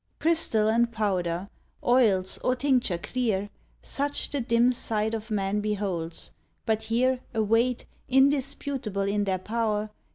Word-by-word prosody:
Crystal 315 -10 +2
and 235 +2 +2
powder, 185 -5 -1 0.4
oils 215 -7 +3
or 255 - +1
tincture 255 -8 +1
clear. 205 +3 -2 0.3
Such 285 +1 -2
the 285 - -1
dim 235 +1 +3
sight 220 -2 -1
of 220 0 -4
man 200 -1 0
beholds, 195 -6 -3 0.3
but 220 -1 +1
here 245 +4 +1 0.2
Await, 225 +3 +1 0.2
indisputable 265 -5 +1
in 205 0 0
their 190 -1 0
pow'r. 215 +1 -2
220 Hz, 125 wpm, -27 LUFS, 205-250 Hz, 0.4 s, oils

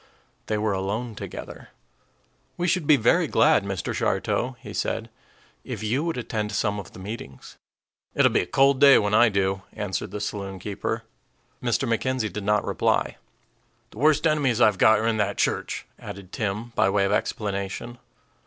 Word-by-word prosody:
They 110 - 0
were 105 -1 0
alone 105 +5 -3
together. 105 - -8 0.9
"We 175 0 0
should 180 -4 0
be 150 - +7
very 160 +9 +3
glad, 155 -8 +4
Mr. 95 -3 -3
Shartow," 125 +1 -1
he - - -9
said, - - -2 0.5
"if - - -6
you 125 +7 0
would 165 -3 -2
attend 110 -3 -3
some 105 -2 0
of 100 - -10
the - - -12
meetings." 95 - -8 0.6
"It'll - - +4
be - - +3
a - - -5
cold 135 0 +3
day 140 -1 +8
when 105 0 0
I 120 +2 +6
do," 95 -1 0
answered 105 -3 -3
the 105 - -5
saloon 100 -2 -4
keeper. 100 +1 -4 0.6
Mr. 125 +2 0
McKenzie 115 -2 -1
did 105 - -4
not 105 +1 +1
reply. - - 0 0.7
"The 105 - -12
worst 155 +2 +3
enemies 145 -7 +2
I've 105 -5 +4
got 110 0 +6
are 110 - -1
in 115 -1 +1
that 100 -1 0
church," - - -1
added 95 -1 -9
Tim, 105 +2 -3
by 95 - +3
way 100 0 +2
of 100 - 0
explanation. 100 +3 -3
110 Hz, 170 wpm, -25 LUFS, 100-125 Hz, 0.9 s, day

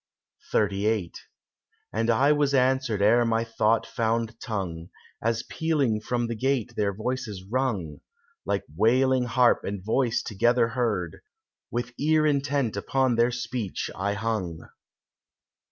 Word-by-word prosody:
XXXVIII 100 -2 +1 0.8
And 115 +2 0
I 130 +6 +4
was 145 -2 +2
answered 130 -5 +2
ere 120 +4 +5
my 115 -1 +1
thought 115 -1 +1
found 115 -1 -1
tongue, 90 -8 -4 0.3
As 115 +1 0
pealing 145 -10 0
from 120 +2 -1
the 115 - -3
gate 130 0 -1
their 100 -1 +1
voices 110 -2 -4
rung, 105 - -2 0.4
Like - - -1
wailing 125 +5 +3
harp 120 0 +3
and 100 -1 -5
voice 115 +1 +1
together 120 +2 +2
heard; 110 -9 -1 0.5
With 120 0 -3
ear 155 +1 +3
intent 140 -5 +1
upon 130 +4 +1
their 120 +1 +3
speech 120 -4 -4
I 100 +2 -1
hung. 100 -7 -3
115 Hz, 125 wpm, -26 LUFS, 105-130 Hz, 0.8 s, ere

